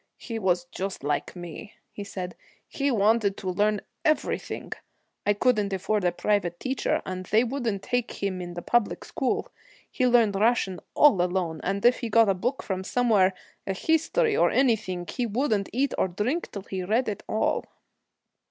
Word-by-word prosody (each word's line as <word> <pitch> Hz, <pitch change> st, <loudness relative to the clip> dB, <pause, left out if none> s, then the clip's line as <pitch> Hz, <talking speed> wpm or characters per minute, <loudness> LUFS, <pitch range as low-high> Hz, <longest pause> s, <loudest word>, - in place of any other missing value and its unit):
'He 230 Hz, -2 st, -5 dB
was 180 Hz, -3 st, +1 dB
just 190 Hz, -5 st, -4 dB
like 145 Hz, +4 st, -2 dB
me,' 175 Hz, +4 st, -9 dB, 0.2 s
he 205 Hz, -, -7 dB
said. 185 Hz, -2 st, -6 dB, 0.3 s
'He 280 Hz, 0 st, -1 dB
wanted 215 Hz, -3 st, +2 dB
to 185 Hz, -2 st, -3 dB
learn 210 Hz, +2 st, +1 dB, 0.2 s
everything. 310 Hz, 0 st, -1 dB, 0.6 s
I 205 Hz, -, +5 dB
couldn't 210 Hz, -3 st, +2 dB
afford 195 Hz, +2 st, 0 dB
a 175 Hz, -, +3 dB
private 175 Hz, -2 st, 0 dB
teacher, 265 Hz, 0 st, -1 dB
and 185 Hz, 0 st, -5 dB
they 220 Hz, +3 st, +4 dB
wouldn't 235 Hz, -6 st, -2 dB
take 245 Hz, -1 st, -1 dB
him 190 Hz, -2 st, -3 dB
in 175 Hz, -1 st, -7 dB
the 175 Hz, -, -6 dB
public 240 Hz, -3 st, +1 dB
school. -, -, -2 dB, 0.4 s
He 255 Hz, -, +1 dB
learned 235 Hz, -4 st, +4 dB
Russian 200 Hz, -3 st, +1 dB, 0.2 s
all 260 Hz, -12 st, +6 dB
alone, 175 Hz, -3 st, -1 dB
and 195 Hz, +3 st, -1 dB
if 245 Hz, +1 st, +5 dB
he 235 Hz, -, -3 dB
got 225 Hz, -1 st, +5 dB
a -, -, +4 dB
book 245 Hz, +9 st, -2 dB
from 190 Hz, -1 st, -3 dB
somewhere 200 Hz, -4 st, +3 dB, 0.3 s
a 195 Hz, -, 0 dB
history 325 Hz, -, +2 dB
or -, -, +4 dB
anything 215 Hz, -9 st, +1 dB
he 245 Hz, -2 st, -2 dB
wouldn't 215 Hz, -3 st, 0 dB
eat 270 Hz, +3 st, 0 dB
or -, -, +3 dB
drink 215 Hz, -, -2 dB
till 200 Hz, -, -6 dB
he 190 Hz, -1 st, -4 dB
read 225 Hz, +7 st, +1 dB
it 210 Hz, -, -3 dB
all.' 215 Hz, -, +1 dB
205 Hz, 175 wpm, -26 LUFS, 185-240 Hz, 0.6 s, all